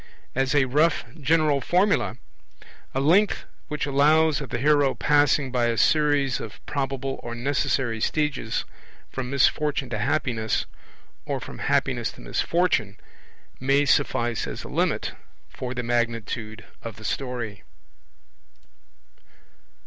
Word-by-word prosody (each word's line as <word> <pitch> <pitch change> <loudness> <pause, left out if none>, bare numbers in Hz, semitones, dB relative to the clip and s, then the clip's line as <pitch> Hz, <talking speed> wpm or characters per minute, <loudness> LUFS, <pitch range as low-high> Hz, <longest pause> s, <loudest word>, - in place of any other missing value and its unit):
As 135 +1 0
a 140 -2 +5
rough 150 +4 +2
general 150 -1 +2
formula, 185 +8 +2 0.8
'a - - +2
length 180 +9 +3 0.2
which 150 -2 -2
allows 150 +2 +3
of 135 - -6
the - - -2
hero 145 +1 +3
passing 145 -2 +3
by 125 -2 +1
a 115 -1 0
series 145 0 +3
of 110 - -8
probable 135 -1 -3
or 120 0 -6
necessary 120 -2 0
stages 135 -6 -1 0.5
from 130 -2 -4
misfortune 140 -1 +1
to 110 - -2
happiness, 120 -3 0 0.6
or - - -1
from - - -9
happiness - - 0
to - - -14
misfortune', 110 - 0 0.6
may 140 +2 +3
suffice 120 -5 +1
as - - -6
a - - -8
limit - - 0 0.4
for 130 0 -6
the 125 - -2
magnitude 115 -2 -2 0.2
of 115 - -7
the 110 - -11
story. 120 -5 -3
135 Hz, 125 wpm, -25 LUFS, 120-145 Hz, 0.8 s, a